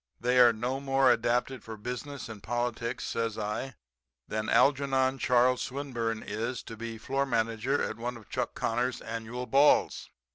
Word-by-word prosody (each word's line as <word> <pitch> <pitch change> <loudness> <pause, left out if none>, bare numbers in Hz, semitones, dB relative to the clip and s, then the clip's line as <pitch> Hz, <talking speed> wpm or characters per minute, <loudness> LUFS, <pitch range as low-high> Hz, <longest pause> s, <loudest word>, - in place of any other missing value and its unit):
They 125 +1 +2
are 120 -1 +8
no 120 +4 -2
more 135 -1 +3
adapted 120 +2 0
for 110 -1 -8
business 125 +5 -6
and 110 -3 -9
politics,' 120 +1 -2
says 115 -2 -2
I, 110 +4 -3 0.5
'than 110 0 -2
Algernon 135 -1 +3
Charles 125 0 +3
Swinburne 120 -5 -3
is 115 +4 -3
to 115 - -8
be 115 0 -6
floor 135 +5 -1
manager 115 +2 0
at - - -3
one 120 +1 -4
of 110 - -15
Chuck - - -3
Connor's 120 +2 -1
annual 115 +2 -5
balls. 140 +3 +3
120 Hz, 155 wpm, -29 LUFS, 115-130 Hz, 0.5 s, are